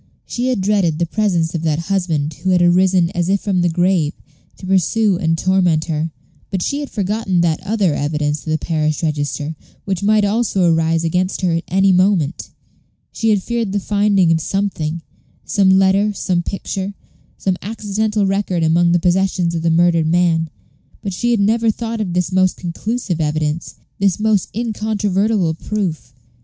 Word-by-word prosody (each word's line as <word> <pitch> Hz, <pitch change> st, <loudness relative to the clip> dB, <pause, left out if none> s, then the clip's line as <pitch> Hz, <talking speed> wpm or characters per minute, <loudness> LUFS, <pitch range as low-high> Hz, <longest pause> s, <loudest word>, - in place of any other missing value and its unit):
She 245 Hz, +1 st, -3 dB
had 250 Hz, -6 st, 0 dB
dreaded 190 Hz, -5 st, +1 dB
the 170 Hz, -, 0 dB
presence 175 Hz, -4 st, 0 dB
of 165 Hz, -, -2 dB
that 155 Hz, -2 st, 0 dB
husband 165 Hz, -4 st, -1 dB
who 190 Hz, -, -1 dB
had 180 Hz, -1 st, +3 dB
arisen, 180 Hz, 0 st, +3 dB
as 175 Hz, 0 st, -1 dB
if 200 Hz, +1 st, +2 dB
from 190 Hz, -3 st, 0 dB
the 175 Hz, -, +2 dB
grave, 175 Hz, -2 st, +1 dB, 0.4 s
to -, -, -10 dB
pursue 195 Hz, +2 st, +2 dB
and 165 Hz, -3 st, +1 dB
torment 180 Hz, -3 st, +2 dB
her, 160 Hz, 0 st, -2 dB, 0.4 s
but 190 Hz, -3 st, -2 dB
she 285 Hz, -, -1 dB
had 290 Hz, -, -5 dB
forgotten 195 Hz, -3 st, -1 dB
that 165 Hz, -2 st, 0 dB
other 200 Hz, -5 st, 0 dB
evidence 150 Hz, +1 st, -1 dB
of -, -, -8 dB
the 155 Hz, -, +2 dB
parish 155 Hz, -1 st, -1 dB
register, 150 Hz, 0 st, -2 dB, 0.3 s
which 190 Hz, -3 st, -2 dB
might 210 Hz, 0 st, +3 dB
also 205 Hz, -2 st, +1 dB
arise 165 Hz, 0 st, +1 dB
against 180 Hz, +4 st, -1 dB
her 180 Hz, -2 st, +1 dB
at 165 Hz, +1 st, -2 dB
any 195 Hz, +2 st, +3 dB
moment. 185 Hz, -4 st, +1 dB, 0.6 s
She 225 Hz, -, -1 dB
had 205 Hz, -3 st, +2 dB
feared 235 Hz, -4 st, -2 dB
the 205 Hz, -, +1 dB
finding 200 Hz, -3 st, +2 dB
of 165 Hz, -, +2 dB
something 170 Hz, -4 st, -2 dB, 0.4 s
some 195 Hz, -2 st, +2 dB
letter 195 Hz, +2 st, +3 dB
some 180 Hz, -3 st, -1 dB
picture 195 Hz, +2 st, -4 dB, 0.4 s
some 190 Hz, -2 st, -1 dB
accidental 210 Hz, 0 st, -1 dB
record 195 Hz, -3 st, 0 dB
among 170 Hz, +2 st, +3 dB
the 175 Hz, -, +3 dB
possessions 180 Hz, -1 st, +1 dB
of 165 Hz, -, -2 dB
the 165 Hz, -, +1 dB
murdered 165 Hz, -1 st, +3 dB
man, 165 Hz, -1 st, +2 dB, 0.5 s
but 195 Hz, -, -3 dB
she 240 Hz, +6 st, -1 dB
had 235 Hz, -3 st, +2 dB
never 225 Hz, +3 st, +2 dB
thought 225 Hz, 0 st, -3 dB
of 185 Hz, -5 st, -3 dB
this 180 Hz, -1 st, 0 dB
most 185 Hz, 0 st, +2 dB
conclusive 180 Hz, 0 st, -3 dB
evidence, 155 Hz, +1 st, -2 dB, 0.2 s
this 195 Hz, -1 st, +1 dB
most 215 Hz, -3 st, +1 dB
incontrovertible 210 Hz, -4 st, 0 dB
proof. 165 Hz, -8 st, -4 dB
185 Hz, 170 wpm, -18 LUFS, 165-205 Hz, 0.6 s, had